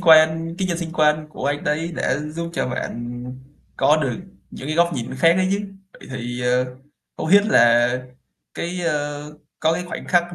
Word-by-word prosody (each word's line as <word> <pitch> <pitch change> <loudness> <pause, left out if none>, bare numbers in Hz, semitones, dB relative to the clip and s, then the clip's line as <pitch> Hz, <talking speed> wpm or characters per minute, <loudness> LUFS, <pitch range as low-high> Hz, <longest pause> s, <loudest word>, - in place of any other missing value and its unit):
quan, 165 -1 +5
cái 190 - 0
nhân 170 -1 -1
sinh 165 -2 -4
quan 155 -2 +2
của 140 - -5
anh 145 0 -1
đấy 160 +3 -1
đã 130 - 0
giúp 155 +3 -5
cho 160 - -1
bạn 120 0 -5 0.5
có 150 - +4
được 130 -3 0 0.4
những 135 - -8
cái 155 +2 -2
góc 170 0 +4
nhìn 120 0 -4
khác 165 +5 +5
đấy 185 0 +2
chứ. 200 - +1 0.3
Vậy - - -14
thì, 120 -1 -4
ờ, 125 +1 +2 0.5
không - - -3
biết 205 +3 +6
là 120 - +5 0.7
cái, 180 +1 -3
ờ, 145 -2 -1 0.4
có 160 +1 +3
cái 180 +2 -2
khoảnh 175 - -7
khắc 175 0 +2
155 Hz, 190 wpm, -22 LUFS, 130-170 Hz, 0.7 s, biết